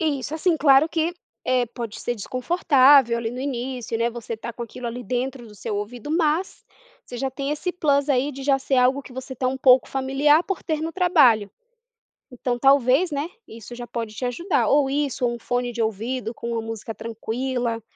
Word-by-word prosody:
Isso 295 -2 -1
assim 325 +1 +1
claro 280 +1 +5
que, 330 +1 -1 0.3
eh, 255 -1 +2
pode 230 -2 -7
ser 240 - -2
desconfortável 260 - +4
ali 230 -1 -3
no 250 +2 -6
início, 250 -3 -3
né, 235 +1 +1
você 230 -1 -6
tá 235 +2 -7
com 240 - -7
aquilo 235 +1 -7
ali 240 +1 -5
dentro 250 +2 -3
do 210 - -14
seu 205 0 -4
ouvido, 230 +6 -6
mas 325 +3 0 0.4
você 245 - -8
já 270 +2 -2
tem 275 +2 -4
esse 300 +5 -2
plus 285 -5 +1
aí 275 +1 +2
de 270 0 -8
já 275 0 +3
ser 270 0 -1
algo 255 +2 +3
que 260 - -13
você 260 +1 -7
tá 255 +1 -2
um 265 - -2
pouco 260 -1 +5
familiar 275 +4 +3
por 390 -2 -3
ter 310 -1 -2
no 325 +1 -3
trabalho. 280 - +4 0.8
Então 250 -1 -3
talvez, 270 +5 +4
né, 290 +2 -2 0.2
isso 230 +1 -10
já 240 0 -7
pode 230 -2 -5
te 255 - -5
ajudar, 315 +9 0
ou 285 -1 +3
isso 275 -2 -1
um 240 0 -2
fone 245 +1 -2
de 235 -1 -2
ouvido 225 +2 -2
com 235 0 -6
uma 230 -1 -2
música 225 0 -6
tranquila, 230 +1 -3
255 Hz, 200 wpm, -23 LUFS, 235-285 Hz, 0.8 s, claro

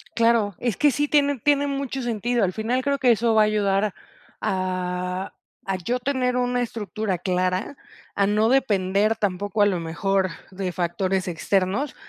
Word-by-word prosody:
Claro, 230 -4 +2
es 240 -5 -1
que 295 -1 +4
sí 290 +4 0
tiene 285 -2 +2
tiene 285 +3 +2
mucho 275 -1 -3
sentido, 240 0 0
al 185 - +1
final 230 +5 -1
creo 280 0 +1
que 250 -3 +4
eso 230 0 +2
va 215 - +6
a - - +4
ayudar 205 -1 +1 0.5
a 185 0 -2 0.3
a 195 - -1
yo 235 +8 -2
tener 250 -1 0
una 245 0 0
estructura 215 -4 -3
clara, 185 - -1 0.4
a 200 - +3
no 215 +3 +2
depender 210 -4 +2
tampoco, 205 0 -1
a 205 - +6
lo 185 -4 0
mejor, 190 +3 0 0.2
de 185 -1 -4
factores 185 +2 -1
externos, 190 - 0
210 Hz, 165 wpm, -24 LUFS, 185-245 Hz, 0.5 s, va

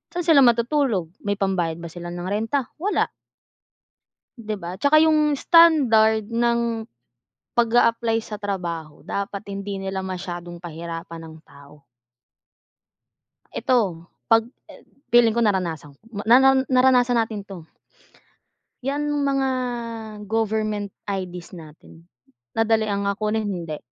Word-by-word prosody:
Saan 355 - -1
sila 320 -4 +5
matutulog? 235 - +2
May 205 0 -2
pambayad 175 -4 -1
ba 170 - -7
sila 175 +1 -8
ng 175 - -6
renta? 225 +5 -1
Wala. 405 +5 0 1.3
Di 215 -2 -5
ba? 175 -2 -6
Tsaka 285 +2 +5
yung 305 -2 +4
standard 235 -12 +5
ng 235 -1 0 0.6
pag-a-apply 230 -1 +2
sa 210 -2 -7
trabaho 170 -6 -5
dapat 200 0 -4
hindi 200 0 -5
nila 195 0 -4
masyadong 175 -2 -6
pahirapan 165 0 -7
ang 160 0 -12
tao. 140 0 -18 1.7
Eto 190 -10 0 0.2
'pag 225 0 +4 0.2
e - - -16 0.3
feeling 235 -2 +5
ko 235 - +2
naranasan 175 -8 -1 0.2
ma 205 - -4
naran 265 +2 +6
naranasan 255 -1 +4
natin 220 -2 -2
'to, 195 -1 -10 1.3
yan 285 +2 -1
mga 275 -2 +1 0.8
government 215 -2 -1 0.2
IDs 180 -3 -5
natin 165 +1 -14 0.5
nadali 225 0 +2
ang, 200 -1 -1
ah, 200 - -1
kunin? 215 0 -1
Hindi? 170 -6 -5
215 Hz, 120 wpm, -23 LUFS, 175-240 Hz, 1.7 s, naran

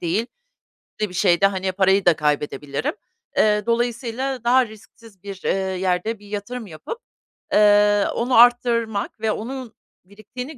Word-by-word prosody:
değil, 185 +7 -1 0.8
de 210 - 0
bir - - -12
şeyde, 185 0 +3
hani, 190 -1 -2
parayı 190 +1 +2
da 175 -2 +5
kaybedebilirim. 145 -1 -2 0.4
Eee, 210 -1 +3
dolayısıyla 240 +2 -2
daha 250 +2 +4
risksiz 220 -2 -17
bir, 195 -2 -8
eee, - - +2 0.3
yerde 190 +4 -1
bir 205 - -16
yatırım 215 +3 -6
yapıp, 180 - -8 0.6
eee, 205 0 +5
onu 250 +2 0
arttırmak 230 -3 +3
ve 220 0 0
onun 245 +2 -6 0.3
biriktiğini 250 +9 -9
210 Hz, 135 wpm, -22 LUFS, 190-235 Hz, 0.8 s, da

